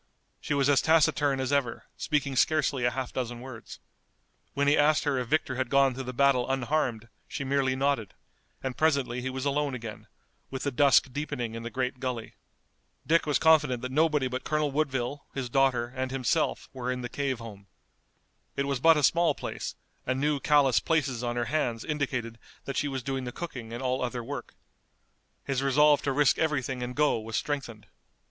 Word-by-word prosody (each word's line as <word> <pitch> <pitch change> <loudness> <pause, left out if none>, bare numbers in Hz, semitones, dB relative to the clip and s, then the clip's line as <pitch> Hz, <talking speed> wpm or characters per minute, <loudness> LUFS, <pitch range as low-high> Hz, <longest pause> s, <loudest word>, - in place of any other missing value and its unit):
She 150 - -2
was 140 -1 +2
as 140 -2 +4
taciturn 145 -3 +3
as 130 +1 -1
ever, 130 -5 0
speaking 140 -3 -1
scarcely 140 -3 +2
a - - +4
half 130 0 -5
dozen 120 -2 -3
words. 125 -2 -10 0.8
When 140 0 +1
he 145 - +5
asked 155 +1 +3
her 140 -3 0
if 125 - -3
Victor 135 -2 0
had 130 -2 -1
gone 135 -1 +4
through 130 +1 -6
the 125 - -4
battle 130 -1 +2
unharmed 130 -3 -1 0.2
she 155 -3 -4
merely 135 -1 +1
nodded, 135 -6 -1 0.5
and 130 -1 -3
presently 140 -6 +1
he 130 - -3
was 130 +1 -4
alone 140 -1 0
again, 115 -3 -8 0.4
with 130 -1 -5
the 140 - -1
dusk 135 -1 +4
deepening 125 -5 -3
in 115 - -5
the 115 - -5
great 130 0 -3
gully. 125 -4 -4 0.7
Dick 165 0 +2
was 145 -3 +3
confident 150 -6 +3
that 125 - -4
nobody 150 -2 +2
but 130 0 -4
Colonel 150 -1 0
Woodville, 140 -1 -2
his 130 -3 -3
daughter, 125 -3 +2
and 130 0 -2
himself 135 +4 0
were 125 -1 -3
in 125 -1 -4
the - - -2
cave 135 -1 -2
home. 105 -3 -11 0.9
It 140 - 0
was 140 -2 -1
but 165 +3 +6
a 150 - 0
small 170 +5 +3
place, - - -5 0.3
and 130 +1 0
new 145 0 +1
callous 140 -4 +4
places 140 -7 0
on 120 0 -2
her 120 0 0
hands 120 -7 -1
indicated 125 -6 -3 0.3
that 135 - -4
she 145 - 0
was 135 -2 -4
doing 135 -1 -3
the 125 - -4
cooking 125 -8 -7
and 120 +3 -5
all 130 0 0
other 125 -1 -3
work. - - -7 0.9
His 135 -2 -1
resolve 145 +2 +4
to 140 - -1
risk 145 0 +3
everything 135 -5 -1
and 125 0 -4
go 150 -5 +2
was 110 +1 -6
strengthened. 135 -7 -3
135 Hz, 195 wpm, -28 LUFS, 125-145 Hz, 0.9 s, but